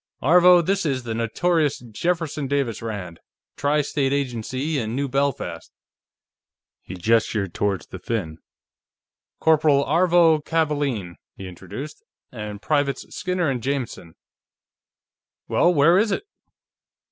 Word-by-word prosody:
"Aarvo, 175 Hz, +3 st, +6 dB
this 195 Hz, +3 st, 0 dB
is 135 Hz, -5 st, -1 dB
the 115 Hz, -2 st, -4 dB
notorious 150 Hz, +7 st, 0 dB
Jefferson 150 Hz, +5 st, -3 dB
Davis 135 Hz, -5 st, -1 dB
Rand. 95 Hz, -7 st, -6 dB, 0.4 s
Tri 145 Hz, +1 st, +1 dB
State 135 Hz, -1 st, -1 dB
Agency, 135 Hz, +2 st, -2 dB
in 115 Hz, -1 st, -3 dB
New 140 Hz, +1 st, -1 dB
Belfast." 135 Hz, -11 st, -2 dB, 1.1 s
He -, -, -9 dB
gestured 105 Hz, -1 st, +1 dB
toward 100 Hz, -2 st, -1 dB
the 95 Hz, -, -7 dB
Finn. 90 Hz, -6 st, -4 dB, 1.0 s
"Corporal 155 Hz, -3 st, +3 dB
Aarvo 165 Hz, 0 st, +4 dB
Kavaalen," 145 Hz, -, -1 dB, 0.2 s
he 95 Hz, -, -7 dB
introduced. 95 Hz, -, -9 dB, 0.3 s
"And 105 Hz, -3 st, -7 dB
Privates 145 Hz, -2 st, -1 dB
Skinner 180 Hz, -2 st, -1 dB
and 130 Hz, -3 st, -1 dB
Jameson.... 125 Hz, -10 st, -4 dB, 1.3 s
Well, 175 Hz, -, +3 dB
where 170 Hz, +3 st, +5 dB
is 215 Hz, 0 st, +1 dB
it?" -, -, -1 dB
140 Hz, 115 wpm, -23 LUFS, 110-160 Hz, 1.3 s, Aarvo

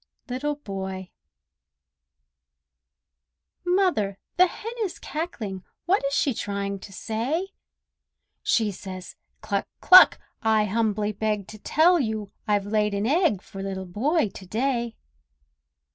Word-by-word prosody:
LITTLE 290 Hz, +4 st, -1 dB
BOY 190 Hz, -7 st, -6 dB, 2.5 s
Mother, 355 Hz, -, +1 dB, 0.2 s
the 365 Hz, +1 st, +6 dB
hen 440 Hz, +5 st, -7 dB
is 390 Hz, -5 st, -2 dB
cackling; 220 Hz, -, -5 dB, 0.2 s
What 370 Hz, +1 st, +2 dB
is 275 Hz, -, -1 dB
she 275 Hz, -, +2 dB
trying 200 Hz, -2 st, -3 dB
to 195 Hz, -, -11 dB
say? 255 Hz, -, -2 dB, 0.9 s
She 220 Hz, -3 st, +2 dB
says, 185 Hz, -1 st, -8 dB, 0.3 s
"Cluck! -, -, -1 dB
cluck! 370 Hz, 0 st, +8 dB, 0.2 s
I 220 Hz, -1 st, +3 dB
humbly 210 Hz, 0 st, 0 dB
beg 210 Hz, -1 st, -2 dB
To 215 Hz, -, -10 dB
tell 335 Hz, -, +4 dB
you 220 Hz, -5 st, 0 dB
all 200 Hz, -, -11 dB, 0.2 s
I've 205 Hz, -2 st, +2 dB
laid 210 Hz, 0 st, +1 dB
an 200 Hz, +1 st, -1 dB
egg 295 Hz, -, +2 dB
For 195 Hz, -, -8 dB
Little 190 Hz, -1 st, -4 dB
Boy 240 Hz, -, +1 dB
to 190 Hz, -, -11 dB
day!" 235 Hz, +1 st, -1 dB
220 Hz, 125 wpm, -25 LUFS, 200-295 Hz, 2.5 s, cluck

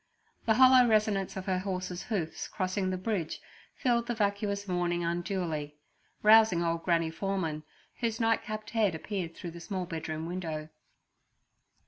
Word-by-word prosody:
The 220 Hz, -, +5 dB
hollow 255 Hz, 0 st, +7 dB
resonance 210 Hz, -3 st, +1 dB
of 190 Hz, -, -5 dB
her 185 Hz, -2 st, 0 dB
horse's 185 Hz, -1 st, -3 dB
hoofs 195 Hz, -8 st, -3 dB
crossing 185 Hz, 0 st, -1 dB
the 185 Hz, -, -1 dB
bridge 185 Hz, -4 st, -2 dB, 0.4 s
filled 235 Hz, -3 st, +1 dB
the 240 Hz, -, -1 dB
vacuous 200 Hz, -1 st, -1 dB
morning 175 Hz, -1 st, 0 dB
unduly, 170 Hz, -4 st, -2 dB, 0.5 s
rousing 215 Hz, -5 st, +6 dB
old 165 Hz, 0 st, 0 dB
Granny 165 Hz, -2 st, +1 dB
Foreman, 165 Hz, -4 st, -2 dB, 0.4 s
whose 230 Hz, -1 st, -1 dB
nightcapped 215 Hz, -2 st, -1 dB
head 215 Hz, -6 st, +2 dB
appeared 175 Hz, -1 st, -4 dB
through 175 Hz, -, -7 dB
the 170 Hz, -, -9 dB
small 185 Hz, -1 st, -3 dB
bedroom 160 Hz, -2 st, -4 dB
window. 165 Hz, -3 st, -4 dB
185 Hz, 140 wpm, -30 LUFS, 170-215 Hz, 0.5 s, hollow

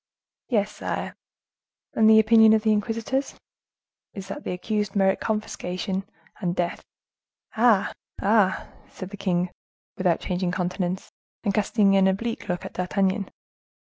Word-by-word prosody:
"Yes, 210 Hz, -4 st, +1 dB
sire." -, -, -4 dB, 0.8 s
"And 220 Hz, 0 st, +5 dB
the 220 Hz, 0 st, +8 dB
opinion 220 Hz, 0 st, +6 dB
of 220 Hz, -1 st, +2 dB
the 220 Hz, -, +3 dB
inquisitors?" 225 Hz, +5 st, -1 dB, 0.8 s
"Is 195 Hz, -2 st, -7 dB
that -, -, -6 dB
the -, -, -3 dB
accused 210 Hz, +2 st, -2 dB
merit 190 Hz, -1 st, +3 dB
confiscation 195 Hz, -2 st, -3 dB, 0.3 s
and 180 Hz, -4 st, -1 dB
death." 175 Hz, -1 st, -2 dB, 0.7 s
"Ah! 220 Hz, -3 st, +3 dB, 0.3 s
ah!" 200 Hz, -2 st, +2 dB, 0.2 s
said 185 Hz, 0 st, -9 dB
the -, -, -6 dB
king, 180 Hz, -2 st, 0 dB, 0.5 s
without 180 Hz, -3 st, +2 dB
changing 180 Hz, -1 st, -2 dB
countenance, 180 Hz, 0 st, -2 dB, 0.3 s
and 200 Hz, -3 st, 0 dB
casting 205 Hz, -1 st, +3 dB
an 190 Hz, -1 st, +5 dB
oblique 225 Hz, +4 st, -2 dB
look 180 Hz, 0 st, -2 dB
at -, -, -7 dB
D'Artagnan. 195 Hz, +2 st, 0 dB
195 Hz, 135 wpm, -25 LUFS, 185-220 Hz, 0.8 s, the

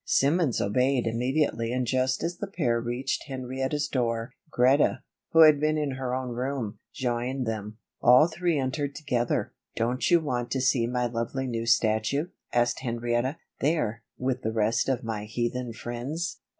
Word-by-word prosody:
Simmons 145 Hz, -2 st, +2 dB
obeyed 125 Hz, +4 st, +1 dB
immediately 120 Hz, 0 st, 0 dB
and 125 Hz, 0 st, 0 dB
just 130 Hz, +3 st, 0 dB
as 170 Hz, +1 st, -2 dB
the 205 Hz, -, -4 dB
pair 125 Hz, -12 st, 0 dB
reached 120 Hz, +3 st, -2 dB
Henrietta's 130 Hz, +2 st, -2 dB
door, 115 Hz, -2 st, -1 dB, 0.2 s
Greta, 130 Hz, +2 st, +3 dB, 0.3 s
who 165 Hz, -, +5 dB
had 155 Hz, -2 st, +8 dB
been 155 Hz, +1 st, +1 dB
in 150 Hz, -2 st, -1 dB
her 130 Hz, -1 st, -3 dB
own 130 Hz, -1 st, -3 dB
room, 120 Hz, -3 st, -3 dB
joined 125 Hz, +1 st, -2 dB
them. 110 Hz, -1 st, -4 dB, 0.2 s
All 125 Hz, +6 st, +7 dB
three 170 Hz, -1 st, 0 dB
entered 140 Hz, +1 st, -2 dB
together. 125 Hz, -6 st, -1 dB, 0.2 s
"Don't 120 Hz, +3 st, 0 dB
you 175 Hz, -1 st, +6 dB
want 125 Hz, -6 st, -2 dB
to 135 Hz, -, 0 dB
see 125 Hz, -2 st, +2 dB
my 125 Hz, 0 st, 0 dB
lovely 120 Hz, +3 st, -2 dB
new 115 Hz, -2 st, -3 dB
statue?" 115 Hz, -, +2 dB, 0.2 s
asked 120 Hz, 0 st, +1 dB
Henrietta. 120 Hz, +2 st, -1 dB, 0.2 s
"There, 125 Hz, -8 st, 0 dB, 0.2 s
with 130 Hz, 0 st, -1 dB
the 110 Hz, -, -1 dB
rest 110 Hz, +3 st, +1 dB
of 130 Hz, -3 st, 0 dB
my 110 Hz, -2 st, -3 dB
heathen 120 Hz, +2 st, -2 dB
friends." 120 Hz, +9 st, -4 dB
125 Hz, 160 wpm, -27 LUFS, 120-140 Hz, 0.3 s, had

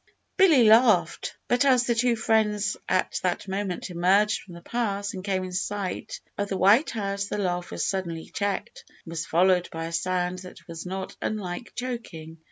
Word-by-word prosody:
Billy 335 Hz, -10 st, +6 dB
laughed; 215 Hz, -7 st, +4 dB
but 245 Hz, +2 st, +3 dB
as 255 Hz, -3 st, +4 dB
the 240 Hz, -, +1 dB
two 235 Hz, +1 st, +2 dB
friends 210 Hz, -3 st, +1 dB
at 185 Hz, -, +1 dB
that 180 Hz, +2 st, -1 dB
moment 190 Hz, -1 st, -3 dB
emerged 195 Hz, +5 st, +3 dB
from 180 Hz, -4 st, -12 dB
the 170 Hz, -, -11 dB
pass 200 Hz, -2 st, -2 dB
and 185 Hz, -2 st, -6 dB
came 190 Hz, -2 st, -1 dB
in 185 Hz, -, -6 dB
sight 195 Hz, +1 st, -3 dB, 0.2 s
of 205 Hz, 0 st, -1 dB
the 195 Hz, -, -1 dB
White 205 Hz, -, +5 dB
House, 200 Hz, -2 st, -2 dB
the 205 Hz, -, -4 dB
laugh 180 Hz, -3 st, -1 dB
was -, -, -2 dB
suddenly 170 Hz, -4 st, -3 dB
checked, 200 Hz, -1 st, -3 dB, 0.2 s
and 165 Hz, -, -9 dB
was 165 Hz, 0 st, -4 dB
followed 180 Hz, +1 st, +3 dB
by 165 Hz, 0 st, -4 dB
a 165 Hz, -, -5 dB
sound 180 Hz, +1 st, -1 dB
that 180 Hz, 0 st, -12 dB
was 165 Hz, +1 st, -7 dB
not 190 Hz, +1 st, -5 dB
unlike 205 Hz, 0 st, -4 dB
choking. 170 Hz, -11 st, -6 dB
195 Hz, 180 wpm, -26 LUFS, 180-215 Hz, 0.2 s, Billy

